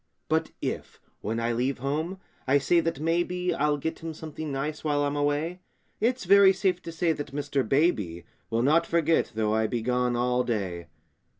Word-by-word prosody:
But -, -, +1 dB
if, -, -, -4 dB, 0.2 s
when 110 Hz, +2 st, -2 dB
I 115 Hz, +1 st, 0 dB
leave 125 Hz, +4 st, 0 dB
home, 155 Hz, +8 st, -2 dB, 0.3 s
I 135 Hz, +2 st, +5 dB
say 140 Hz, +5 st, +3 dB
that 165 Hz, -3 st, -1 dB
maybe 175 Hz, +3 st, 0 dB
I'll 150 Hz, -2 st, +1 dB
get 160 Hz, +3 st, -4 dB
him 165 Hz, -1 st, -6 dB
something 155 Hz, -1 st, -6 dB
nice 150 Hz, +3 st, -3 dB
while 145 Hz, -2 st, +1 dB
I'm 145 Hz, 0 st, -1 dB
away, 145 Hz, +5 st, 0 dB, 0.4 s
It's 240 Hz, +2 st, +1 dB
very 195 Hz, +1 st, +7 dB
safe 185 Hz, -2 st, 0 dB
to 165 Hz, -, -7 dB
bet 165 Hz, 0 st, 0 dB
that 145 Hz, -2 st, -6 dB
Mr. 145 Hz, -1 st, 0 dB
Baby 105 Hz, -, +1 dB, 0.2 s
Will 115 Hz, +1 st, +1 dB
not 165 Hz, +5 st, +3 dB
forget, 165 Hz, -1 st, +2 dB
though 110 Hz, -1 st, +1 dB
I 110 Hz, 0 st, +2 dB
be 115 Hz, 0 st, -2 dB
gone 125 Hz, 0 st, +1 dB
all 125 Hz, +1 st, +1 dB
day. 95 Hz, -8 st, -3 dB
145 Hz, 185 wpm, -27 LUFS, 125-165 Hz, 0.4 s, very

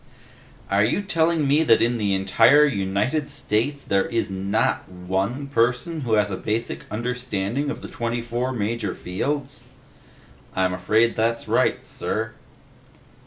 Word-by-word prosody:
"Are 100 Hz, +1 st, +4 dB
you 120 Hz, -, +1 dB
telling 165 Hz, -4 st, +1 dB
me 145 Hz, +3 st, +4 dB
that 115 Hz, -8 st, +5 dB
in 120 Hz, 0 st, +1 dB
the 100 Hz, -2 st, +1 dB
entire 115 Hz, +10 st, +5 dB
United 105 Hz, +5 st, -1 dB
States, 140 Hz, +7 st, -1 dB
there 100 Hz, 0 st, +1 dB
is 115 Hz, -4 st, -1 dB
not 95 Hz, +2 st, 0 dB
one 95 Hz, +9 st, -2 dB
person 140 Hz, +5 st, 0 dB
who 120 Hz, -4 st, -1 dB
has 105 Hz, -1 st, +2 dB
a 95 Hz, -, -2 dB
basic 105 Hz, -11 st, -3 dB
understanding 125 Hz, +2 st, -2 dB
of 145 Hz, -, -5 dB
the -, -, -5 dB
twenty 120 Hz, 0 st, -3 dB
four 120 Hz, +2 st, -2 dB
major 110 Hz, -3 st, -2 dB
fields?" 140 Hz, +11 st, -3 dB, 0.9 s
"I'm 95 Hz, 0 st, +1 dB
afraid 110 Hz, +6 st, +2 dB
that's 115 Hz, +1 st, 0 dB
right, -, -, +1 dB
sir." 110 Hz, +1 st, -3 dB
115 Hz, 140 wpm, -23 LUFS, 100-130 Hz, 0.9 s, that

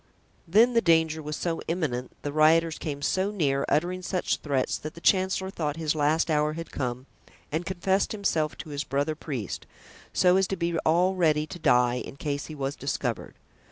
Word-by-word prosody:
Then 225 Hz, +8 st, +5 dB
the 230 Hz, -, +4 dB
danger 160 Hz, -3 st, +3 dB
was 150 Hz, 0 st, -4 dB
so 165 Hz, 0 st, -2 dB
imminent, 150 Hz, -8 st, -2 dB
the 145 Hz, -, -3 dB
rioters 160 Hz, +1 st, +4 dB
came 145 Hz, -3 st, -5 dB
so 190 Hz, +5 st, +1 dB
near, 140 Hz, -9 st, 0 dB
uttering 180 Hz, +4 st, +1 dB
such 180 Hz, 0 st, -1 dB
threats, 140 Hz, -4 st, -1 dB
that 155 Hz, -, -7 dB
the -, -, -9 dB
chancellor 190 Hz, +1 st, +2 dB
thought 150 Hz, -6 st, -2 dB
his 155 Hz, -2 st, 0 dB
last 155 Hz, +2 st, +1 dB
hour 150 Hz, 0 st, +2 dB
had 165 Hz, +1 st, -7 dB
come 125 Hz, -1 st, -3 dB, 0.5 s
and 160 Hz, +3 st, -2 dB
confessed 190 Hz, +1 st, 0 dB
himself 165 Hz, -8 st, -1 dB
to 160 Hz, -, -8 dB
his 145 Hz, 0 st, -3 dB
brother 145 Hz, +2 st, -1 dB
priest, 135 Hz, -, -5 dB, 0.4 s
so 180 Hz, 0 st, +4 dB
as 190 Hz, -1 st, +2 dB
to 195 Hz, -, -2 dB
be 170 Hz, -1 st, -1 dB
all 175 Hz, +4 st, +3 dB
ready 155 Hz, -4 st, +2 dB
to 175 Hz, -, -9 dB
die 125 Hz, -5 st, +3 dB
in -, -, -9 dB
case 145 Hz, 0 st, -3 dB
he 155 Hz, -, -8 dB
was 140 Hz, 0 st, -3 dB
discovered. 130 Hz, -4 st, -3 dB
155 Hz, 190 wpm, -27 LUFS, 145-180 Hz, 0.5 s, Then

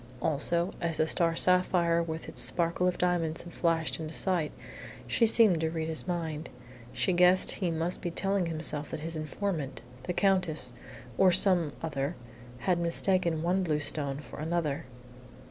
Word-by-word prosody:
Also, 170 Hz, +5 st, 0 dB
as 165 Hz, -3 st, -1 dB
the 155 Hz, -, +2 dB
star 165 Hz, +1 st, +1 dB
sapphire 175 Hz, -2 st, +3 dB
with 160 Hz, -1 st, -5 dB
its 125 Hz, -, -3 dB
sparkle 170 Hz, +8 st, 0 dB
of 180 Hz, -, 0 dB
diamonds 170 Hz, -3 st, 0 dB
had 175 Hz, -, -11 dB
flashed 165 Hz, -2 st, 0 dB
into 160 Hz, 0 st, -5 dB
sight, 175 Hz, -5 st, 0 dB, 0.5 s
she 230 Hz, -, +2 dB
had -, -, +5 dB
seemed 210 Hz, -8 st, +5 dB
to 160 Hz, -, 0 dB
read 160 Hz, -1 st, -3 dB
his 160 Hz, +2 st, -1 dB
mind. 165 Hz, -3 st, -3 dB, 0.4 s
She 185 Hz, -, 0 dB
guessed 180 Hz, +1 st, +5 dB
he 185 Hz, -4 st, -2 dB
must 165 Hz, +2 st, -2 dB
be 175 Hz, -, -2 dB
telling 195 Hz, +1 st, -1 dB
himself 155 Hz, -2 st, -2 dB
that -, -, -6 dB
his 165 Hz, +1 st, -4 dB
informant 155 Hz, -2 st, -4 dB, 0.2 s
the 180 Hz, -, -2 dB
Countess, 180 Hz, -10 st, +1 dB, 0.5 s
or 190 Hz, -1 st, +6 dB
some 175 Hz, -5 st, +3 dB
other 145 Hz, 0 st, -2 dB, 0.5 s
had 180 Hz, -2 st, +1 dB
mistaken 170 Hz, -1 st, +2 dB
one 180 Hz, +3 st, +1 dB
blue 155 Hz, -5 st, 0 dB
stone 145 Hz, -2 st, -1 dB
for 145 Hz, -, -10 dB
another. 155 Hz, -3 st, -2 dB
170 Hz, 165 wpm, -29 LUFS, 155-180 Hz, 0.5 s, or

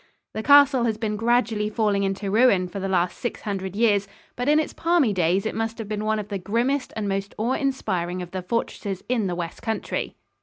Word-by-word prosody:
The 220 Hz, -, -3 dB
castle 285 Hz, -1 st, +6 dB
has 220 Hz, -2 st, 0 dB
been 215 Hz, -1 st, -2 dB
gradually 225 Hz, -1 st, +1 dB
falling 210 Hz, -2 st, +1 dB
into 195 Hz, 0 st, -2 dB
ruin 205 Hz, -5 st, +4 dB
for 195 Hz, +2 st, -6 dB
the 195 Hz, -, -2 dB
last 180 Hz, -1 st, 0 dB
six 240 Hz, -, -4 dB
hundred 195 Hz, -3 st, -4 dB
years, 205 Hz, -3 st, +2 dB, 0.3 s
but 245 Hz, +3 st, -1 dB
in 300 Hz, +1 st, +5 dB
its 310 Hz, -, -2 dB
palmy 330 Hz, -10 st, +2 dB
days 185 Hz, +2 st, +1 dB
it -, -, -1 dB
must 225 Hz, 0 st, -3 dB
have 225 Hz, -3 st, -6 dB
been 210 Hz, 0 st, -3 dB
one 220 Hz, 0 st, +1 dB
of 210 Hz, -1 st, -5 dB
the 200 Hz, -2 st, -3 dB
grimmest 245 Hz, +8 st, 0 dB
and 215 Hz, -2 st, -2 dB
most 195 Hz, 0 st, -3 dB
awe 230 Hz, +4 st, 0 dB
inspiring 185 Hz, -11 st, -1 dB
of 175 Hz, -, -10 dB
the 185 Hz, -, -4 dB
fortresses 195 Hz, -1 st, -3 dB
in 235 Hz, -5 st, 0 dB
the 175 Hz, -, -2 dB
west 170 Hz, -1 st, -5 dB
country. 225 Hz, -1 st, -3 dB
215 Hz, 220 wpm, -24 LUFS, 195-235 Hz, 0.3 s, castle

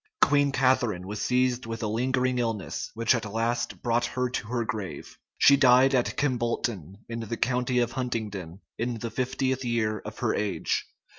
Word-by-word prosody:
Queen 145 Hz, -1 st, +4 dB
Catharine 125 Hz, -8 st, +2 dB
was 105 Hz, +2 st, -5 dB
seized 125 Hz, 0 st, +1 dB
with 115 Hz, 0 st, -4 dB
a -, -, 0 dB
lingering 125 Hz, +3 st, 0 dB
illness, 110 Hz, -9 st, -2 dB
which 115 Hz, +1 st, +3 dB
at 110 Hz, -4 st, -3 dB
last 115 Hz, +2 st, -2 dB
brought 120 Hz, 0 st, +2 dB
her 125 Hz, -1 st, -2 dB
to 115 Hz, -, -3 dB
her 120 Hz, 0 st, -1 dB
grave; 105 Hz, -7 st, -5 dB, 0.2 s
she 140 Hz, -, +7 dB
died 130 Hz, 0 st, +5 dB
at 125 Hz, -2 st, +1 dB
Kimbolton, 120 Hz, -, -1 dB
in 115 Hz, 0 st, -5 dB
the 115 Hz, 0 st, -4 dB
county 125 Hz, 0 st, 0 dB
of 120 Hz, -1 st, +2 dB
Huntingdon, 105 Hz, -8 st, -4 dB, 0.2 s
in 120 Hz, +1 st, -1 dB
the 115 Hz, +1 st, -5 dB
fiftieth 130 Hz, 0 st, -1 dB
year 115 Hz, -3 st, 0 dB
of -, -, -9 dB
her -, -, 0 dB
age. 105 Hz, -1 st, -1 dB
120 Hz, 170 wpm, -27 LUFS, 110-125 Hz, 0.2 s, she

